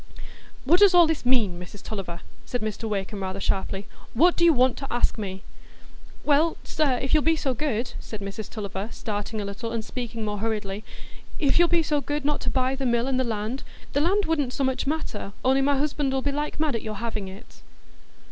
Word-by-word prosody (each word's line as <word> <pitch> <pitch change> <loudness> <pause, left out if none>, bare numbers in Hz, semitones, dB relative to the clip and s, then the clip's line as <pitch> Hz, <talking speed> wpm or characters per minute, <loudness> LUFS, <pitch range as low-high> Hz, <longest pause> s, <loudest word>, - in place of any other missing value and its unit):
"What 340 +7 +5
does 400 -3 +7
all 350 -1 +9
this 315 -6 -1
mean, 215 -9 +3
Mrs 180 +3 -10
Tulliver?" 180 -5 -5 0.2
said 245 - -3
Mr 215 +1 -3
Wakem 200 0 -2
rather 190 +1 -3
sharply. 195 0 -1 0.3
"What 340 +8 +5
do 345 - +1
you 340 - +8
want 255 -3 +3
to 275 - -6
ask 240 - +2
me?" 190 -2 -5 0.8
"Why, 305 +3 +4
sir, 285 -5 +1
if 265 - -3
you'll 305 - +6
be 325 +2 +3
so 275 -4 0
good," 245 -3 -1
said 215 - -7
Mrs 200 +1 -6
Tulliver, 200 -1 -4
starting 215 0 -4
a 205 - -2
little, 200 +3 -4
and 230 -2 -2
speaking 230 -3 -4
more 205 -1 -2
hurriedly,—"if 215 +7 -2
you'll 345 - +6
be 340 -1 +3
so 295 -1 +1
good 290 0 -3
not 295 0 +1
to - - 0
buy 260 0 +1
the 270 -1 -1
mill 235 +1 +2
an' 265 -1 +1
the 260 - +2
land,—the 235 +5 -3
land 390 +5 +3
wouldn't 290 -6 0
so 275 - -1
much 260 0 0
matter, 275 -10 -3
only 265 +1 +4
my 280 0 +3
husband 285 -1 0
ull' 265 - 0
be 285 - +1
like 295 +2 -3
mad 305 -3 +1
at 230 - -2
your 215 -1 -5
having 215 -2 -3
it." 195 +5 -12
245 Hz, 210 wpm, -26 LUFS, 210-290 Hz, 0.8 s, all